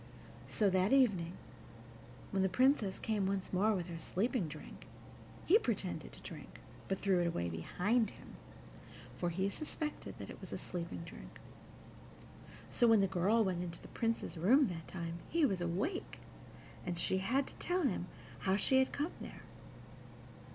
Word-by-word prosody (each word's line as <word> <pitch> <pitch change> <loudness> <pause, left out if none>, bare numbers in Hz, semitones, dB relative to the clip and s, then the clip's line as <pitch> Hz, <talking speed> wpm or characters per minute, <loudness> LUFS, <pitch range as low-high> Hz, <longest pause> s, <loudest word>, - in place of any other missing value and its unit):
So 210 - +2
that 185 +2 +3
evening, 205 -11 +4 1.0
when 195 - +1
the 190 - +3
Princess 230 -1 +3
came 210 -3 0
once 195 -1 -2
more 205 +4 +4
with 180 -2 -3
her 170 -2 -6
sleeping 210 - 0
drink, 155 0 -10 0.6
he 405 +6 +7
pretended 445 - -2
to - - -11
drink, - - -9 0.3
but 195 - 0
threw 195 -2 +3
it 175 - +2
away 85 - -1
behind 200 - +1
him, - - -14 0.9
for 175 - 0
he 190 +3 0
suspected 300 +7 -4
that - - -7
it - - -11
was - - -8
a - - -2
sleeping 170 -1 -5
drink. 170 - -11 1.3
So, 240 - +4
when 225 -3 +6
the - - +4
girl 195 +5 +3
went 185 -3 0
into 170 -1 -5
the - - -12
Prince's 225 -6 -1
room 250 - +5
this 165 -2 -4
time 170 -2 -5
he 330 -2 +3
was 195 -9 0
awake, 195 - -2 0.7
and 175 -2 -3
she 190 +2 +1
had 255 +8 +1
to - - -12
tell 360 0 0
him 185 - 0 0.3
how 190 0 +2
she 260 +6 +4
had 265 - +2
come 295 +4 -1
there. - - -8
195 Hz, 165 wpm, -35 LUFS, 175-240 Hz, 1.3 s, he